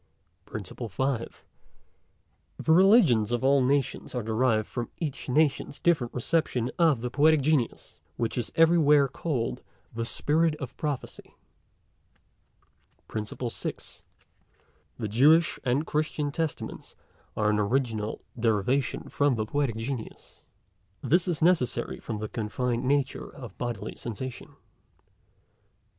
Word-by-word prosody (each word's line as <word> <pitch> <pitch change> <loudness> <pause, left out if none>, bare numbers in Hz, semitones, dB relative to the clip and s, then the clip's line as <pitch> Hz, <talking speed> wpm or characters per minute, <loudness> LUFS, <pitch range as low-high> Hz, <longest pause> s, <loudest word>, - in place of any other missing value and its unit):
PRINCIPLE 110 +3 -6
FIFTH. 130 +3 -3 1.1
The 160 - 0
Religions 170 - +5
of 120 +1 -1
all 135 0 +4
Nations 135 0 0
are 120 - -1
derived 110 0 +1
from 120 -2 -4
each 150 -5 -4
Nation's 145 0 +1
different 150 -9 +2
reception 125 -2 0
of 155 -8 +4
the 125 0 -3
Poetic 150 +3 +4
Genius, 140 -4 -1 0.2
which 115 - -1
is 120 - -3
everywhere 155 -4 +5
call'd 135 -3 -3 0.3
the 115 0 -2
Spirit 155 +6 +1
of 130 -5 -7
Prophecy. 145 -4 -5 1.7
PRINCIPLE 110 +3 -4
SIXTH. - - -7 1.0
The 110 - -3
Jewish 150 +10 +4
and 130 +4 +1
Christian 150 -1 -1
Testaments 160 0 -4 0.4
are 105 -1 +2
an 105 - +1
original 110 -1 -1
derivation 115 +4 0
from 145 -2 +1
the 110 -1 -1
Poetic 140 -1 -1
Genius. 115 +1 -6 0.6
This 175 +4 +2
is 165 -3 -1
necessary 170 -8 +1
from 110 - -5
the 110 +1 -4
confined 120 +3 -2
nature 140 0 0
of 120 -5 -10
bodily 115 -4 -4
sensation. 120 +2 -7
130 Hz, 120 wpm, -27 LUFS, 115-150 Hz, 1.7 s, Religions